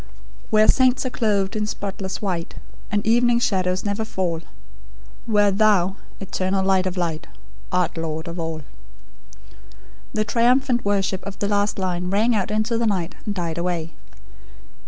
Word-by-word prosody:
"Where 215 Hz, 0 st, +5 dB
saints 260 Hz, 0 st, +4 dB
are 255 Hz, -, -2 dB
clothed 205 Hz, -3 st, 0 dB
in 210 Hz, -1 st, -1 dB
spotless 195 Hz, -1 st, -4 dB
white, 175 Hz, -4 st, -2 dB, 0.4 s
And 205 Hz, 0 st, 0 dB
evening 240 Hz, +1 st, +4 dB
shadows 185 Hz, -4 st, 0 dB
never 205 Hz, +2 st, -1 dB
fall; 180 Hz, -6 st, -2 dB, 0.9 s
where 205 Hz, -2 st, +4 dB
Thou, 195 Hz, -2 st, +3 dB, 0.2 s
Eternal 190 Hz, 0 st, -1 dB
Light 190 Hz, -1 st, +3 dB
of 185 Hz, 0 st, -4 dB
Light, 165 Hz, -3 st, -2 dB, 0.4 s
Art 180 Hz, -2 st, +1 dB
Lord 160 Hz, +1 st, -3 dB
of 170 Hz, +1 st, -5 dB
All." 160 Hz, -2 st, -4 dB, 1.5 s
The 215 Hz, 0 st, +1 dB
triumphant 245 Hz, +2 st, +2 dB
worship 195 Hz, -2 st, 0 dB
of 200 Hz, -, -7 dB
the 200 Hz, -, -1 dB
last 205 Hz, 0 st, +1 dB
line 180 Hz, -2 st, -1 dB
rang 215 Hz, +5 st, +2 dB
out 205 Hz, -4 st, 0 dB
into 215 Hz, +2 st, 0 dB
the 230 Hz, -, +1 dB
night, 185 Hz, -4 st, -1 dB
and 205 Hz, -, -1 dB
died 170 Hz, -3 st, -2 dB
away. 170 Hz, -2 st, -2 dB
195 Hz, 150 wpm, -23 LUFS, 180-215 Hz, 1.5 s, Where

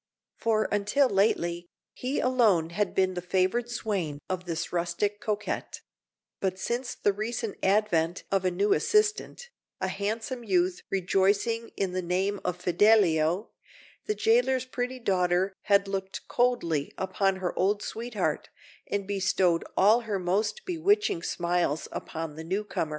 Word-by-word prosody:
For 220 Hz, -1 st, +1 dB
until 210 Hz, +7 st, +2 dB
lately, 175 Hz, -5 st, +1 dB, 0.2 s
he 260 Hz, +3 st, -2 dB
alone 215 Hz, -11 st, +3 dB
had 205 Hz, +4 st, -1 dB
been 185 Hz, -1 st, +2 dB
the 180 Hz, -, -4 dB
favoured 190 Hz, +6 st, 0 dB
swain 195 Hz, -10 st, -2 dB
of 185 Hz, -1 st, -3 dB
this 165 Hz, -1 st, -4 dB
rustic 175 Hz, +4 st, -1 dB
coquette; 210 Hz, -1 st, -3 dB, 0.6 s
but 185 Hz, -1 st, -1 dB
since 240 Hz, +6 st, -3 dB
the 205 Hz, -, +1 dB
recent 220 Hz, +1 st, -3 dB
advent 185 Hz, -4 st, +1 dB
of 195 Hz, -1 st, +2 dB
a 185 Hz, -, +2 dB
new 195 Hz, +3 st, +2 dB
assistant, 425 Hz, -, 0 dB, 0.3 s
a -, -, -1 dB
handsome 225 Hz, +4 st, -3 dB
youth 185 Hz, -3 st, +1 dB
rejoicing 200 Hz, +5 st, +1 dB
in 195 Hz, -2 st, 0 dB
the 185 Hz, 0 st, -2 dB
name 190 Hz, +3 st, -1 dB
of 180 Hz, -1 st, -2 dB
Fidelio, 180 Hz, -2 st, +3 dB, 0.6 s
the 425 Hz, -, 0 dB
jailer's 440 Hz, -, +2 dB
pretty 255 Hz, 0 st, -3 dB
daughter 185 Hz, -4 st, +1 dB
had 200 Hz, -1 st, +4 dB
looked 195 Hz, -1 st, -4 dB
coldly 205 Hz, -, +1 dB
upon 190 Hz, +1 st, 0 dB
her 185 Hz, -2 st, -3 dB
old 205 Hz, +2 st, +1 dB
sweetheart, 230 Hz, -1 st, -3 dB, 0.4 s
and 200 Hz, -1 st, -2 dB
bestowed 190 Hz, -3 st, +1 dB
all 210 Hz, +5 st, +6 dB
her 215 Hz, -4 st, -2 dB
most 195 Hz, -, -1 dB
bewitching 375 Hz, -, +1 dB
smiles 170 Hz, -3 st, -1 dB
upon 160 Hz, -2 st, -5 dB
the 160 Hz, -, -6 dB
newcomer. 190 Hz, -2 st, -2 dB
195 Hz, 140 wpm, -28 LUFS, 180-225 Hz, 0.6 s, all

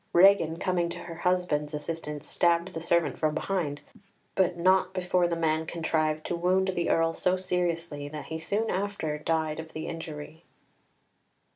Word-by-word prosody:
Regan, 175 Hz, -3 st, +6 dB
coming 175 Hz, -1 st, 0 dB
to 170 Hz, -, -5 dB
her 170 Hz, -, -7 dB
husband's 170 Hz, -4 st, 0 dB
assistance, 150 Hz, -1 st, -4 dB
stabbed 170 Hz, +1 st, +2 dB
the 165 Hz, -, -4 dB
servant 170 Hz, 0 st, +1 dB
from 155 Hz, -1 st, +1 dB
behind, 155 Hz, -5 st, -2 dB, 0.5 s
but 180 Hz, -2 st, +2 dB
not 185 Hz, +1 st, +3 dB
before 180 Hz, -1 st, +2 dB
the 170 Hz, -, -1 dB
man 160 Hz, -1 st, 0 dB
contrived 155 Hz, -2 st, 0 dB
to 175 Hz, -, -1 dB
wound 185 Hz, +2 st, +2 dB
the 175 Hz, -2 st, -1 dB
Earl 165 Hz, 0 st, +3 dB
so 185 Hz, +2 st, +1 dB
seriously 170 Hz, -5 st, -1 dB
that 150 Hz, 0 st, -7 dB
he 160 Hz, 0 st, -5 dB
soon 205 Hz, +7 st, 0 dB
after 185 Hz, -6 st, -2 dB
died 155 Hz, 0 st, -1 dB
of 160 Hz, 0 st, -8 dB
the 155 Hz, +1 st, -5 dB
injury. 160 Hz, 0 st, -7 dB
170 Hz, 160 wpm, -28 LUFS, 155-180 Hz, 0.5 s, Regan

